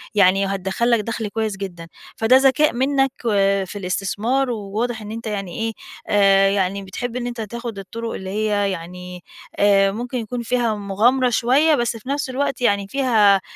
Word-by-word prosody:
يعني 195 0 +4
هتدخل 195 +5 -1
لك 235 - +4
دخل 225 0 -3
كويّس 215 -1 -3
جدًا. 175 -4 -7 0.3
فده 235 +4 +5
ذكاء 275 +3 +3
منّك 270 +2 +1
و 195 -3 +2
في 205 - -8
الاستثمار 205 +8 -1
وواضح 220 +1 -3
إن 210 0 -8
أنت 225 0 -6
يعني 195 -2 -4
إيه، 225 0 -2 0.3
آآ، 195 -1 +4
يعني 195 0 -1
بتحب 235 +6 -5
إن 245 -1 -3
أنت 240 -1 -5
تاخد 235 0 -6
الطرق 230 +4 -6
اللي 190 - -6
هي 205 -1 0
يعني، 180 0 -8 0.4
آآ، 195 -1 +4
ممكن 245 +5 -4
يكون 240 +1 -4
فيها 235 -1 0
مغامرة 220 +6 +2
شويّة، 265 +7 +3
بس 240 -3 -1
في 255 +4 -11
نفْس 280 -1 -1
الوقت 270 +1 -2
يعني 200 -4 +1
فيها 215 -7 +3
215 Hz, 175 wpm, -21 LUFS, 195-245 Hz, 0.4 s, فده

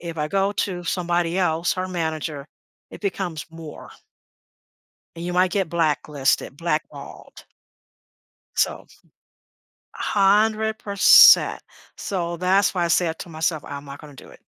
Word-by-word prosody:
If 170 -1 -7
I 150 0 -2
go 195 +3 0
to 180 -3 -3
somebody 175 0 -1
else, 170 -1 0
her 185 0 -4
manager, 160 -4 -4 0.4
it - - -11
becomes 185 -5 -4
more. 165 -2 -11 1.3
And 170 - -8
you 180 - -4
might 180 +1 +2
get 190 -4 -1
blacklisted, 150 -4 -1
blackballed. 160 -2 -6 1.1
So. - - -1 1.1
100%. 210 0 +4 0.3
So 175 -3 -4
that's 190 +2 +2
why 175 -1 0
I - - -1
said 165 -1 0
to - - -8
myself, 160 -1 -2
"I'm 140 0 -8
not 140 0 -10
gonna 150 -2 -13
do - - -14
it." - - -17
170 Hz, 130 wpm, -22 LUFS, 160-190 Hz, 1.3 s, 100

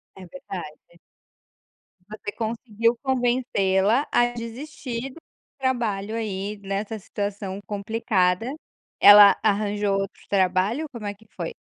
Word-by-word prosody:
É 190 - -11
verdade. 185 - -8 1.3
Você 210 -1 -7
conseguiu 230 +1 -1
convencê-la 240 -3 +1
a 240 - +4
desistir 240 +1 -6
do 295 - -14 0.4
trabalho 225 -5 -1
aí 210 -2 -3
nessa 200 +3 -3
situação 200 -1 -5
complicada. 205 +1 0 0.5
Ela 205 -1 +9
arranjou 205 -1 +1
outro 195 0 -5
trabalho, 195 - +1
como 235 -4 -8
é 205 - -3
que 210 +2 -22
foi? - - -4
215 Hz, 110 wpm, -24 LUFS, 195-240 Hz, 1.3 s, Ela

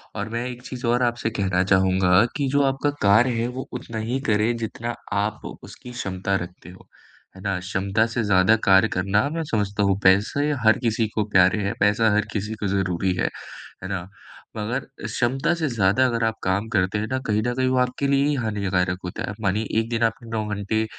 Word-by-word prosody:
और 105 +1 -4
मैं 115 +2 -3
एक 125 0 -8
चीज़ 130 -1 -7
और 120 +1 +2
आपसे 120 -2 0
कहना 95 -2 +1
चाहूँगा 95 +1 +4
कि 140 -2 0
जो 145 +1 +2
आपका 135 +1 +1
कार्य 110 +5 +5
है, 120 - 0
वो 130 +1 -6
उतना 120 -2 -6
ही 130 +2 0
करें, 110 +2 +2
जितना 115 +1 -4 0.2
आप 105 +1 -2 0.2
उसकी 125 - -11
क्षमता 95 -5 -2
रखते 90 0 -12
हों, 90 - -15 0.5
है 95 - -12
ना? 100 -2 -1
क्षमता 100 +4 0
से 115 0 -2
ज़्यादा 100 +1 +4
कार्य 95 +3 +6
करना 100 +6 +1
मैं 165 +1 -3
समझता 105 -1 0
हूँ। 100 0 +2
पैसे 105 +10 +3
हर 110 - +6
किसी 115 -2 0
को 105 - +2
प्यारे 95 +2 +4
हैं, 100 - -1
पैसा 105 +2 +3
हर 105 0 +2
किसी 105 +1 -3
को 105 -1 -3
ज़रूरी 95 -1 0
है। - - 0 0.5
है - - -4
ना? 95 -2 -4 0.5
मगर 115 +5 -1 0.3
क्षमता 135 +7 0
से 165 -2 -1
ज़्यादा 110 +2 +2
अगर 115 -1 -1
आप 110 0 0
काम 95 +4 0
करते 95 0 +1
हैं 110 - -2
ना, 130 - +1
कहीं 105 0 +1
न 120 - 0
कहीं 130 0 +1
वो 130 - +1
आपके 125 +2 0
लिए 140 0 +3
ही 150 - +1
हानिकारक 95 -6 -1
होता 90 - -5
है। 105 - -4
मानिए 105 +1 0 0.2
एक 115 0 -2
दिन 115 -1 0
आपने 115 +1 -1
9 110 -2 -2
घंटे 110 +2 -1
110 Hz, 210 wpm, -23 LUFS, 95-120 Hz, 0.5 s, कार्य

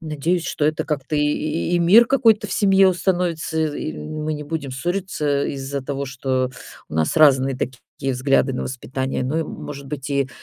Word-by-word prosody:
Надеюсь, 165 +2 -1
что 150 - -1
это 155 0 +1
как-то 150 0 -2
и 150 +3 0
и - - +3
мир 195 +8 +7
какой-то 225 -5 +3
в - - -5
семье 195 -1 +5
установится, 175 -3 -1 0.2
и 75 - -4
мы 155 - -4
не 150 - -6
будем 145 -3 -4
ссориться 150 -2 -1
из-за 140 0 -4
того, 140 +1 -4
что 130 -1 -1 0.4
у - - -9
нас 80 - 0
разные 135 -4 +5
такие 130 +1 -4
взгляды 135 +1 +2
на 125 - -3
воспитание, 130 0 -3
но 145 +5 -1
и, - - +1
может 140 -2 -8
быть, 140 0 -6
и 140 -1 +1
145 Hz, 180 wpm, -21 LUFS, 135-165 Hz, 0.4 s, мир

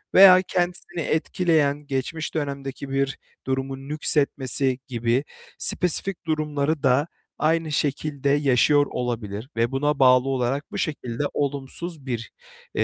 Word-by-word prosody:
veya 185 -1 +9
kendisini 175 -1 -2
etkileyen 155 -2 +1
geçmiş 140 +4 -3
dönemdeki 140 -2 -4
bir 135 0 -1 0.3
durumun 135 +1 -3
nüksetmesi 140 -3 +1
gibi 120 +1 0 0.3
spesifik 180 +1 0
durumları 150 -1 -1
da 135 +4 +3 0.3
aynı 160 0 +1
şekilde 145 -1 -1
yaşıyor 145 +1 +4
olabilir. 115 -2 -4
Ve 115 +1 +1
buna 145 +2 0
bağlı 130 0 +5
olarak 135 +2 -1
bu - - -5
şekilde 125 -4 -3
olumsuz 145 +2 -4
bir, 120 -3 -4 0.4
eee, - - +2
140 Hz, 115 wpm, -24 LUFS, 130-155 Hz, 0.4 s, veya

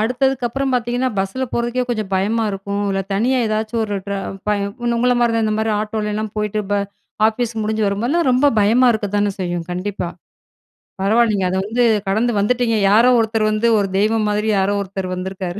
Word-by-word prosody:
அடுத்ததுக்கப்புறம் 260 +2 0
பாத்தீங்கன்னா 245 +1 0
பஸ்ல 195 +7 -1
போறதுக்கே 240 +1 -1
கொஞ்சம் 215 -4 -3
பயமா 215 +4 +1
இருக்கும், 200 +1 -3
இல்ல 195 - 0
தனியா 250 +6 +1
ஏதாச்சும் 220 +1 -1
ஒரு 205 - -4
ட்ரா 200 0 -2 0.3
பய 210 -1 +1 0.2
உன்ன 235 -1 0
உங்கள 250 +1 +3
மாரி 235 -1 +3
தான் 225 - +1
இந்த 215 - 0
மாரி 220 0 0
ஆட்டோலலாம் 215 0 -3
போயிட்டு 210 0 -1
ப - - +3 0.5
ஆஃபீஸ் 230 +1 -1
முடிஞ்சு 220 +1 -1
வரும்போதெல்லாம் 245 +11 0
ரொம்ப 255 +3 +3
பயமா 230 +5 +4
இருக்கத்தானே 205 -1 0
செய்யும்? 175 -2 -2
கண்டிப்பா, 180 0 -3 0.9
பரவால்லீங்க! 210 -1 +2
அத 185 - -2
வந்து 235 +3 0 0.2
கடந்து 220 +5 +1
வந்துட்டீங்க! 230 +1 +1
யாரோ 230 +4 +5
ஒருத்தர் 220 -1 +1
வந்து, 215 +2 +1
ஒரு 200 -1 -1
தெய்வம் 215 0 +1
மாரி 210 +1 0
யாரோ 200 +2 +1
ஒருத்தர் 190 -1 -5
வந்திருக்காரு! 185 0 -5
215 Hz, 170 wpm, -19 LUFS, 200-240 Hz, 0.9 s, யாரோ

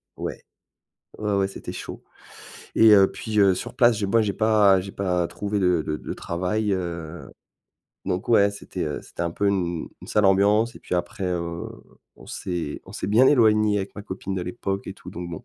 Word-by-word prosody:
Ouais, - - -5 0.8
ouais, 105 -1 -1
ouais, 95 0 +1
c'était - - -8
chaud. - - -8 0.7
Et 110 -1 +7
heu, 95 -1 +6
puis 110 -1 -2
heu, 95 -2 +5
sur - - -6
place, 120 -3 +4
j 100 - -1
moi 115 +3 +3
j'ai 100 -2 -1
pas 105 -3 +4
j'ai 95 +1 -7
pas 90 -3 0
trouvé 105 0 -3
de 90 -4 +2
de 75 0 -3
de - - -6
travail, 95 +5 -2
heu, 85 -3 -4 0.8
donc, 95 +2 -3
ouais 100 -3 +5
c'était, 100 - -6
heu, 75 -1 -3
c'était - - -7
un 85 - -1
peu 100 +4 -1
une 90 -4 -1
une - - -12
sale 105 -1 +2
ambiance 105 +4 +3
et - - -12
puis 90 - -2
après, 90 +3 -4
heu, 85 -2 -3 0.5
on - - -15
s'est 85 -5 -4
on - - -13
s'est - - -4
bien 115 +6 +5
éloignés 110 -5 +4
avec 95 -1 -4
ma 105 - -7
copine 95 -1 -5
de 90 - -2
l'époque 95 +1 -4
et - - -4
tout, - - -14
donc, 85 0 -7
bon 80 - -8
95 Hz, 205 wpm, -24 LUFS, 90-105 Hz, 0.8 s, Et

